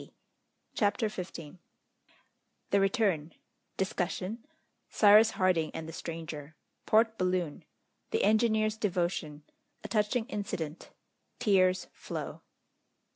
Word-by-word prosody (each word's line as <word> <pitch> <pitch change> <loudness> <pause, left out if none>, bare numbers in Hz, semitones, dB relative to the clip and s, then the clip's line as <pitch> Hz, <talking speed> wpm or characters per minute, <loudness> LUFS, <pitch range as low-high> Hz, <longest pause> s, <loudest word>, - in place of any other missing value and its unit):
] - - -48
CHAPTER 210 +1 +2
XV 175 -5 -7 1.1
The 200 - +4
Return 195 -7 +1 0.4
Discussion 190 - -2 0.4
Cyrus 215 +1 +7
Harding 180 -4 +2
and 160 - -5
the 160 - -8
Stranger 160 -2 -7 0.3
Port 225 +1 +3
Balloon 180 -4 -1 0.5
The 445 - 0
Engineer's 215 -1 +3
Devotion 175 -7 -2 0.4
A - - -5
touching 220 +2 +1
Incident 190 - -5 0.5
Tears 185 -5 +3
flow. - - -6
190 Hz, 95 wpm, -30 LUFS, 165-215 Hz, 1.1 s, Cyrus